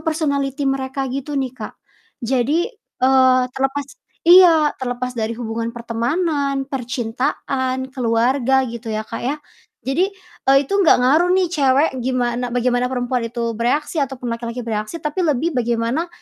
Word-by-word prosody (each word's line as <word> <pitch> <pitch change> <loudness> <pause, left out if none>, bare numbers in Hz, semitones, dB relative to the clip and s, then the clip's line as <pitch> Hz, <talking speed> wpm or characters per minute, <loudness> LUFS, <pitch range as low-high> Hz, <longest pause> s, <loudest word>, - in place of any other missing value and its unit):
personality 285 -4 -1
mereka 270 0 -1
gitu 275 +2 -4
nih 265 -2 -1
Kak. - - -7 0.5
Jadi, 275 - 0 0.3
eee, 260 -1 +5
terlepas 270 +2 -1 0.4
iya, 335 -4 +7
terlepas 250 0 -3
dari 230 -1 -3
hubungan 230 -1 -3
pertemanan, 275 +4 -1
percintaan, 260 +1 -3
keluarga 255 +2 +2
gitu 235 -1 -7
ya, 215 0 -2
Kak, 230 - -6
ya. 275 +4 -1 0.5
Jadi, 310 +9 +1 0.4
eee, 270 - +7
itu 275 - -8
nggak 365 - +6
ngaruh 315 +7 +4
nih 375 -1 +3
cewek 280 -1 +3
gimana 245 -1 -1
bagaimana 245 0 0
perempuan 245 -2 -2
itu 235 0 -3
bereaksi 270 +8 -1
ataupun 255 -3 -3
laki-laki 235 +1 -5
bereaksi, 215 +5 -3
tapi 300 +2 -3
lebih 320 -1 +1
bagaimana, 240 +5 -1
260 Hz, 135 wpm, -20 LUFS, 240-285 Hz, 0.5 s, iya